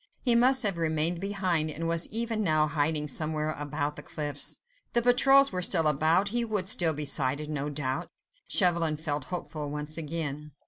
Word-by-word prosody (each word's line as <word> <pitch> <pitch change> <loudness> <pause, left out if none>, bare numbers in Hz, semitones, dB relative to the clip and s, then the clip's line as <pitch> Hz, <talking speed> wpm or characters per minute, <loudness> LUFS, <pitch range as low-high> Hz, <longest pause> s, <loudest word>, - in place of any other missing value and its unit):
He 245 - +3
must 255 +3 +4
have 195 -5 0
remained 160 +1 0
behind, 185 -6 0
and 165 +2 -3
was 165 0 -1
even 225 0 -1
now 155 -4 +3
hiding 150 0 0
somewhere 155 +1 -1
about 145 0 -4
the - - -6
cliffs; 145 -2 -1 0.4
the 235 - +3
patrols 270 +3 +5
were 180 -1 -2
still 175 -2 +3
about, 160 +6 +2
he 240 +3 0
would 210 -5 -2
still 175 -5 +4
be 150 0 -5
sighted, 145 +2 0
no 145 -1 -3
doubt. 135 -2 -4 0.4
Chauvelin 170 -5 +2
felt 150 -3 -2
hopeful 155 -4 -5
once 150 +2 -4
again. 150 -2 -5
160 Hz, 175 wpm, -28 LUFS, 150-190 Hz, 0.4 s, patrols